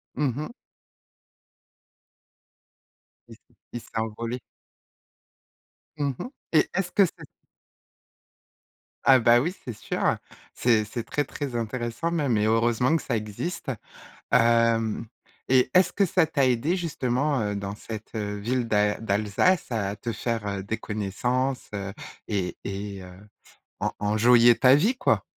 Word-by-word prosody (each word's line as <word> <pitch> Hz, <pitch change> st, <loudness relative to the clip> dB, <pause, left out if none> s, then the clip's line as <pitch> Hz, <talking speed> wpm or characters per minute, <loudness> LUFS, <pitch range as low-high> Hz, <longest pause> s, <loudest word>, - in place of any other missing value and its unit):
Mmh 135 Hz, -3 st, 0 dB
mh. 155 Hz, -, -4 dB, 2.8 s
Il -, -, -12 dB
s -, -, -15 dB, 0.4 s
il 120 Hz, -, -3 dB
s'est -, -, -17 dB
envolé. 115 Hz, +3 st, -3 dB, 1.6 s
Mmh 140 Hz, -2 st, 0 dB
mh. -, -, -4 dB, 0.3 s
Et, 155 Hz, -, +4 dB
est-ce 180 Hz, -1 st, -1 dB
que 200 Hz, -, +5 dB
c'est -, -, -9 dB, 1.8 s
Ah 135 Hz, -1 st, +7 dB
bah 120 Hz, +1 st, +5 dB
oui, 170 Hz, +5 st, -1 dB
c'est 120 Hz, -, -4 dB
sûr, -, -, -5 dB
heu, -, -, +3 dB, 0.4 s
c'est 115 Hz, -3 st, +2 dB
c'est 115 Hz, +2 st, -5 dB
très, 145 Hz, +5 st, -1 dB
très, 140 Hz, -5 st, -5 dB
intéressant 120 Hz, +7 st, -2 dB
même 140 Hz, -9 st, +1 dB
et 105 Hz, -, +2 dB
heureusement 120 Hz, +6 st, +2 dB
que -, -, 0 dB
ça 120 Hz, -4 st, -1 dB
existe! 110 Hz, -, -4 dB, 0.6 s
Hem 115 Hz, -1 st, +3 dB, 0.4 s
et 130 Hz, -1 st, +4 dB
est-ce 185 Hz, 0 st, +5 dB
que 200 Hz, -, +3 dB
ça 175 Hz, -1 st, +3 dB
t'a 140 Hz, -3 st, +1 dB
aidée 130 Hz, +9 st, +1 dB
justement, 140 Hz, -4 st, 0 dB
heu, 105 Hz, -1 st, -1 dB
dans 100 Hz, 0 st, -4 dB
cette, 110 Hz, +1 st, -8 dB
heu, 105 Hz, -1 st, -3 dB
ville 120 Hz, +3 st, -1 dB
d'al 105 Hz, 0 st, +1 dB
d'Alsace 105 Hz, -, +1 dB
à 100 Hz, -3 st, -1 dB
te 115 Hz, +3 st, -4 dB
faire, 115 Hz, -1 st, -2 dB
heu, 100 Hz, -1 st, -3 dB
des 110 Hz, +3 st, -3 dB
connaissances, 120 Hz, +6 st, -2 dB
heu 100 Hz, -1 st, -4 dB, 0.3 s
et 95 Hz, -4 st, -2 dB
et 100 Hz, -1 st, -5 dB
heu, 90 Hz, 0 st, -11 dB, 0.7 s
en -, -, -1 dB
enjoyer 115 Hz, +3 st, +5 dB
ta 130 Hz, +1 st, +6 dB
vie, 215 Hz, -, +2 dB
quoi? -, -, +2 dB
115 Hz, 140 wpm, -26 LUFS, 105-135 Hz, 2.8 s, Ah